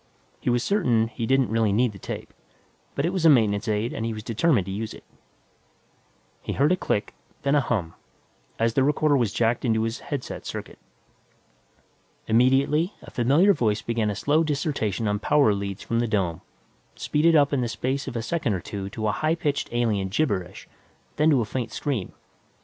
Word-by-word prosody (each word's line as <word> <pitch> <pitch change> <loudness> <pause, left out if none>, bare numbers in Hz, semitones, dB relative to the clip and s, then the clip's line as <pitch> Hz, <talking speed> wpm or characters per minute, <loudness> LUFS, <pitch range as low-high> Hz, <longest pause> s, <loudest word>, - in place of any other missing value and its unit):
He - - -2
was 120 -1 +1
certain 120 - +2
he 115 0 -4
didn't 135 -4 +2
really 110 -2 +2
need 120 +3 +2
the 100 - -12
tape, - - -7 0.6
but 140 - 0
it 175 - -1
was 185 -3 -1
a 165 - +7
maintenance 110 -5 +3
aid 110 +2 -1
and 110 - -4
he 115 -1 -2
was 110 - -7
determined 115 - +1
to 95 - -5
use 105 +3 -4
it. - - -14 1.4
He - - -4
heard 145 +4 +2
a - - +5
click, 105 - -2 0.3
then 140 - +2
a 145 - +4
hum, 100 -10 -2 0.6
as 115 0 +1
the 135 - +3
recorder 150 +1 +2
was 120 -6 +1
jacked 115 +2 0
into 110 -3 +1
his 115 +1 -3
headset 140 -4 -6
circuit. - - -7 1.5
Immediately, 135 - +2
a - - -12
familiar 145 - +4
voice 110 - 0
began 115 -2 0
a 105 - -2
slow 150 +9 +2
dissertation 140 - -1
on 105 0 0
power 145 -2 +3
leads 100 0 -4
from 115 - -1
the 120 - +1
dome, 95 -7 -1 0.5
speeded 160 +2 +2
up 145 -1 +4
in 135 - +1
the 120 - 0
space 130 +4 -3
of - - -5
a 115 - -2
second 130 - -1
or - - -2
two 100 +2 -6
to 110 0 -5
a - - +2
high 155 +9 0
pitched 150 -4 -2
alien 110 -5 0
gibberish, 100 - -2 0.5
then 155 +1 +4
to 140 -5 +4
a - - -1
faint 115 0 -4
scream. 130 -10 -3
120 Hz, 195 wpm, -25 LUFS, 105-145 Hz, 1.5 s, a